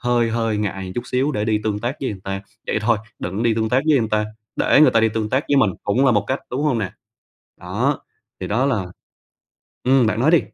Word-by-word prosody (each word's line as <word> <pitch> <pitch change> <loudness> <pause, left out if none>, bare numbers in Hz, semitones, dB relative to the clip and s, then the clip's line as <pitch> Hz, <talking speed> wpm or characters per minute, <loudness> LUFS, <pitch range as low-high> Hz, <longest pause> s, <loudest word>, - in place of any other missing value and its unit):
hơi 120 -2 +1
hơi 115 -1 0
ngại 95 -3 -3
chút 120 - -2
xíu 135 +4 0
để 105 - -1
đi 110 -1 +1
tương 105 -2 0
tác 120 +6 -3
với 130 - -1
người 100 - -7
ta. 95 0 -4 0.2
Vậy - - 0
thôi, 110 0 +2 0.2
đừng 95 +5 -3
đi 115 -2 +2
tương 110 0 0
tác 125 +4 +2
với 150 -3 +5
người 110 -2 -1
ta, 105 0 +2 0.3
để - - +4
người 155 - +7
ta 115 - +3
đi 110 - +4
tương 110 0 -2
tác 130 +3 +1
với 145 - +3
mình 130 -7 +4
cũng 120 +7 +2
là 130 - +5
một 105 -1 +2
cách, 130 +4 -1
đúng 130 +4 -2
hông 145 -6 +1
nè? 100 -3 -3 0.7
Đó, - - -1 0.4
thì - - -3
đó 125 +6 +1
là 105 -9 0 1.0
Ừm, 130 -2 +4
bạn 110 +1 0
nói 140 +6 +4
đi. 170 - +5
115 Hz, 250 wpm, -21 LUFS, 105-130 Hz, 1.0 s, người